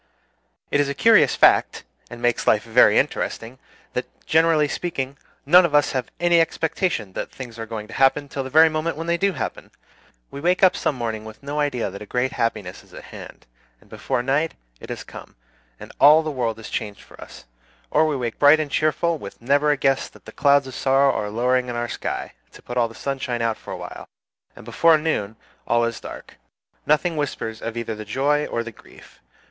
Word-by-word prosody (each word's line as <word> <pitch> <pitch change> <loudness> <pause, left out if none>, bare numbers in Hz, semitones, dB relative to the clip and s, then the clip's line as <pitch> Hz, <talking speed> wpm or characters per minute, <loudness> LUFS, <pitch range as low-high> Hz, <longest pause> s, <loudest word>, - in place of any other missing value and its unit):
It 145 - +2
is 145 -1 +1
a 140 - -3
curious 225 +7 +5
fact, - - +3 0.3
and 120 0 -10
makes 120 -1 0
life 105 - +3
very 115 +2 +5
interesting, 120 +3 -2 0.3
that, - - -3 0.2
generally 160 -1 +3
speaking, 140 -4 -4 0.3
none 180 +6 +7
of 160 -4 0
us 145 - +3
have 130 -3 -3
any 175 -1 +4
expectation 160 - -2
that - - -5
things 120 -3 -9
are 115 - -5
going 110 -1 -6
to - - -12
happen 135 +2 +2
till 135 -1 -4
the 130 - -7
very 160 +4 +6
moment 155 +1 -2
when 165 - -5
they 170 0 0
do 195 0 +1
happen. - - -5 0.6
We 140 - -7
wake 180 +4 +1
up 185 - +6
some - - -1
morning 115 -3 -4
with 110 +4 -12
no 145 +2 -4
idea 135 -8 -1
that 100 - -9
a 105 - -9
great 125 +3 -1
happiness 110 -7 -3
is - - -18
at - - -10
hand, - - -11 0.3
and - - -25
before 120 - -2
night 145 +5 0 0.2
it - - -12
has - - -5
come, - - -12 0.4
and - - -11
all 155 +3 +7
the 155 - -3
world 120 -5 -2
is 110 - -10
changed 105 -4 -4
for - - -16
us; - - -12 0.5
or 155 +1 +3
we 150 - -1
wake 120 -3 -4
bright 145 +2 +6
and 150 -2 -3
cheerful, 155 +2 0
with 100 -4 -10
never 140 +5 +2
a 145 - +2
guess 135 0 +1
that - - -20
clouds 140 -1 +4
of 130 - -9
sorrow 135 +1 +2
are 105 -1 -3
lowering 125 +3 0
in 120 - -4
our 120 0 -2
sky, - - -5 0.2
to - - -15
put 120 - -7
all 120 -2 +2
the 115 - -14
sunshine 130 -3 -3
out 115 -1 0
for - - -11
a - - -5
while, - - -9 0.5
and - - -13
before 160 +8 +4
noon 130 -10 -2 0.3
all 120 0 +2
is 115 0 -4
dark. - - -11 0.5
Nothing 155 +2 +1
whispers 115 -6 -4
of 115 0 -5
either 115 -1 -3
the 110 0 -7
joy 140 +7 0
or 115 - -2
the 115 - -8
grief. - - -18
135 Hz, 215 wpm, -22 LUFS, 115-155 Hz, 0.6 s, none